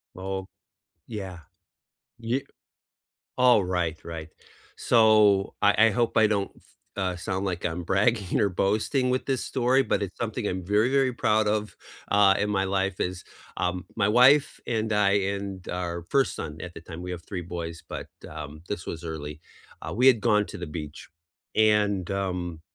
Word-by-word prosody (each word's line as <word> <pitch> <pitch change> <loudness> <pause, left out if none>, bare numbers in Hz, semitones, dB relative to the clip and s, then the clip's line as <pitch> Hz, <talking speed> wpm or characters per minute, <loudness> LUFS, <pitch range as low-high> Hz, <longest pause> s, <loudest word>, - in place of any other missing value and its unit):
Oh, 95 0 -4 0.6
yeah. 95 -6 -6 0.8
Y 115 +4 -1 1.0
Alright, 90 -10 +2
right. 80 -2 -7 0.5
So, 105 -4 +4
I 105 +2 +5
I - - +4
hope 120 +2 0
I 110 -1 +6
don't 100 -2 0
s - - -22 0.3
uh, 95 -2 -1
sound 95 +2 -3
like 90 -3 -3
I'm 85 +1 -2
bragging 100 +2 +1
or 100 - +3
boasting 110 +8 0
with 130 - -1
this 135 -2 0
story, 130 +1 +2
but - - 0
it's 95 -2 -5
something 115 -1 -3
I'm 90 -2 -3
very, 105 +6 +2
very 135 -2 +3
proud 110 -2 +2
of, 105 -3 -1 0.4
uh, 100 -1 +6
in 105 - 0
my 95 -2 +1
life 95 0 -1
is, 90 0 -3 0.3
um, 90 0 -2
my 100 -2 +2
wife 130 +6 +5
and 110 -2 -1
I 105 -1 +3 0.2
and 100 -2 -6
our 85 -1 -4
1st 135 -1 +2
son 75 +1 -6
at 90 -1 -7
the - - -9
time- 85 +1 -9
we 90 - -5
have 85 -2 -6
3 95 -4 -5
boys, 85 -1 -6
but, - - -6 0.2
um, 75 0 -8
this 100 -4 -4
was 80 - -5
early- 75 -2 -6 0.4
uh, - - -5
we 130 - +5
had 125 -4 +6
gone 105 0 +3
to - - -8
the 90 -2 -6
beach, 75 -1 -8 0.5
and, 105 -4 +3
um, 90 -4 -3
100 Hz, 170 wpm, -26 LUFS, 90-110 Hz, 1.0 s, I